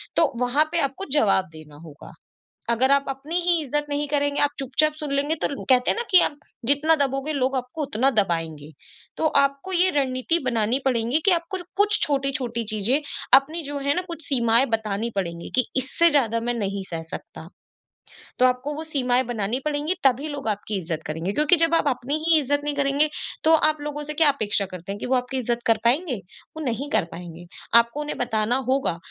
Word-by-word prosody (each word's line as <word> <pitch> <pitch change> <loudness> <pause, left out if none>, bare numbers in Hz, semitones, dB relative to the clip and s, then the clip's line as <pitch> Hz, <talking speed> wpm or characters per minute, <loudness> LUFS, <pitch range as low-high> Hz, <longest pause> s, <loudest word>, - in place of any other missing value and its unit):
तो 315 -4 +3
वहाँ 260 +5 +3
पे 340 - +1
आपको 275 +9 -8
जवाब 195 -4 +2
देना 155 -2 -13
होगा। 145 -1 -13 0.6
अगर 250 +3 +3
आप 280 0 +3
अपनी 280 +5 -5
ही 350 +1 +1
इज़्ज़त 295 +1 -2
नहीं 290 0 -1
करेंगे, 285 -1 0
आप 290 - +3
चुपचाप 290 +3 +1
सुन 300 -2 -6
लेंगे 285 +3 +1
तो - - +2
ल 285 - -4
कहते 250 -1 +4
हैं - - -3
ना, 470 - -1
कि 370 - +9
आप - - +1 0.3
जितना 290 +5 +3
दबोगे, 280 +1 -1
लोग 270 -1 0
आपको 255 +5 -4
उतना 270 -1 +1
दबाएँगे। 165 - -1 0.5
तो 320 - +2
आपको 275 +7 -2
ये 365 +1 +4
रणनीति 265 +4 0
बनानी 235 +1 +1
पड़ेगी 245 +2 +1
कि 395 - +5
आपको 345 +2 -1
र 355 - -9
कुछ 420 +1 +3
छोटी-छोटी 270 -4 -1
चीज़ें, 220 +8 +1 0.3
अपनी 300 +5 +4
जो 285 0 -5
है 285 - +3
ना 360 - 0
कुछ 335 -2 -6
सीमाएँ 235 -2 +3
बतानी 220 0 -1
पड़ेंगी, 170 -3 -4
कि 255 -2 +3
इससे 310 +6 +3
ज़्यादा 230 -6 +2
मैं 240 +1 -2
नहीं 200 -4 -3
सह 165 -2 -4
सकता। 160 +1 -9 0.9
तो 255 - +5
आपको 255 +4 0
वो 315 - -5
सीमाएँ 255 -3 +1
बनानी 230 +1 -2
पड़ेंगी 300 +4 -1
तभी 270 +4 0
लोग 285 -5 -6
आपकी 205 0 -3
इज़्ज़त 165 -3 -4
करेंगे। 160 +5 -3
क्योंकि 300 +4 +5
जब 330 0 +2
आप 320 - +1
अपनी 265 +2 -1
ही 325 -2 +5
इज़्ज़त 285 0 0
नहीं 295 0 -2
करेंगे, 285 +2 +2 0.3
तो 320 - +5 0.2
आप 310 - -2
लोगों 295 0 -5
से 300 +1 -5
क्या 295 - +6
अपेक्षा 215 -7 0
करते 180 +2 -7
हैं 205 - -6
कि - - -5
वो 260 - +1
आपकी 250 +1 -2
इज़्ज़त 240 -1 -1
कर 225 -1 +4
पाएँगे? 275 +3 +2 0.4
वो 315 - -5
नहीं 260 +4 -2
कर - - 0
पाएँगे। 175 0 -9 0.3
आपको 235 +5 -1
उन्हें 295 - -5
बताना 240 0 0
होगा, 265 -10 0
270 Hz, 205 wpm, -23 LUFS, 230-295 Hz, 0.9 s, कि